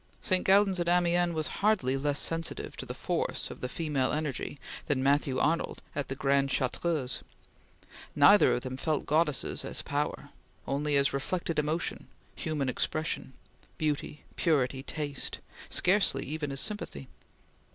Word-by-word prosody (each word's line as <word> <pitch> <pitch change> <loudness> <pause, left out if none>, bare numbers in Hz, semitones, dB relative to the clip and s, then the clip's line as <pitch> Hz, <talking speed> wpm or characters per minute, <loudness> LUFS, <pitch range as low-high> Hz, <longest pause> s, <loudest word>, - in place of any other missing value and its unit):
St. 185 -1 +2
Gaudens 195 -1 +4
at 175 0 +1
Amiens 175 -1 +3
was 155 -1 0 0.2
hardly 195 -12 +3
less 145 +1 0
sensitive 165 +2 -2
to - - -6
the - - -5
force - - -2
of - - -10
the 125 - -3
female 145 -4 0
energy 150 -2 -2 0.3
than 130 -3 +1
Matthew 140 -1 +2
Arnold 165 +2 0
at 140 -2 -2
the 135 - -4
Grande 140 0 +2
Chartreuse. 135 +1 0 0.9
Neither 200 +9 +7
of 125 - -2
them 130 0 -5
felt 155 +1 -1
goddesses 150 -2 +1
as - - -3
power - - -2 0.4
only 145 +1 0
as 140 -1 +2
reflected 165 +4 -1
emotion, 155 +3 -2 0.3
human 150 -4 -2
expression, 155 +1 -2 0.4
beauty, 150 -1 -2
purity, 135 -5 +1
taste, 145 -1 -3 0.3
scarcely 180 -7 +3
even 150 0 -3
as 135 - -2
sympathy. 205 - -3
150 Hz, 140 wpm, -30 LUFS, 135-170 Hz, 0.9 s, Neither